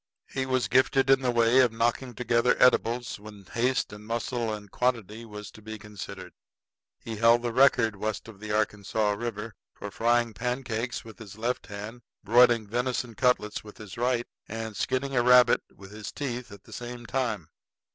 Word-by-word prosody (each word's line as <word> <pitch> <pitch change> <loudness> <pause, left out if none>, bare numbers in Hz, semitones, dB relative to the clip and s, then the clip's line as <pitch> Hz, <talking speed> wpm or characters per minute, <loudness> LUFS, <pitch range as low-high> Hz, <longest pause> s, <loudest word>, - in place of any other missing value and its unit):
He 130 0 -2
was 130 -1 +1
gifted 130 +1 +3
in 135 0 +5
the 130 - 0
way 120 +1 +4
of 125 -3 +5
knocking 120 +2 -1
together 120 0 +2
edibles 120 -2 +3
when 105 -2 -12
haste 125 +3 0
and 105 0 -10
muscle 115 +1 -2
and 105 -2 -7
quantity 115 -3 -1
was 105 -1 -9
to 110 - -15
be 110 +1 -7
considered. 100 -3 -9 0.6
He 115 -1 -7
held 115 +2 +5
the 120 -1 -2
record 125 -4 +4
west 110 +2 -3
of 110 -3 -12
the 105 0 -6
Arkansas 105 0 0
River 110 0 -4 0.2
for 100 - -7
frying 120 +1 +2
pancakes 125 -1 -3
with 110 +1 -12
his 105 -2 -11
left 120 +3 -2
hand, 105 +4 -7 0.2
broiling 120 +1 +5
venison 120 +2 -2
cutlets 120 -3 +1
with 105 -1 -13
his 105 -5 -10
right, 120 0 0 0.2
and 110 -1 -5
skinning 135 +6 -1
a 120 - +4
rabbit 125 0 +6
with 95 0 -13
his 105 0 -7
teeth 125 -5 -5
at 100 - -12
the - - -14
same 120 0 -7
time. 115 - -2
115 Hz, 175 wpm, -27 LUFS, 105-125 Hz, 0.6 s, rabbit